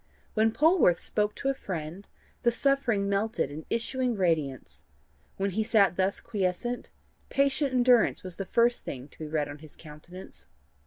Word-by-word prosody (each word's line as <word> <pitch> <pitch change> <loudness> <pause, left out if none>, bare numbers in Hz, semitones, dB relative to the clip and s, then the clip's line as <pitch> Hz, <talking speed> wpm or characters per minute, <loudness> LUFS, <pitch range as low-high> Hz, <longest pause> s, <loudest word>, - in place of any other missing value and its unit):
When 220 0 +3
Polwarth 305 - +4
spoke 210 0 -1
to 270 - -2
a - - +2
friend, 180 - -6 0.3
the 240 - +4
suffering 235 -5 +1
melted 200 - 0
in 155 +2 -8
issuing 245 +1 -1
radiance; 140 - -1 0.5
when 195 0 -1
he 220 +4 0
sat 200 -6 +3
thus 190 +2 0
quiescent, 215 +3 -2 0.4
patient 275 0 +2
endurance 245 -2 +4
was 185 -2 -8
the 195 - -4
first 235 +1 +2
thing 130 +1 -7
to - - -18
be 155 - -5
read 150 -1 -1
on 145 +1 -9
his 155 -1 -14
countenance. 150 - -12
200 Hz, 160 wpm, -28 LUFS, 160-240 Hz, 0.5 s, Polwarth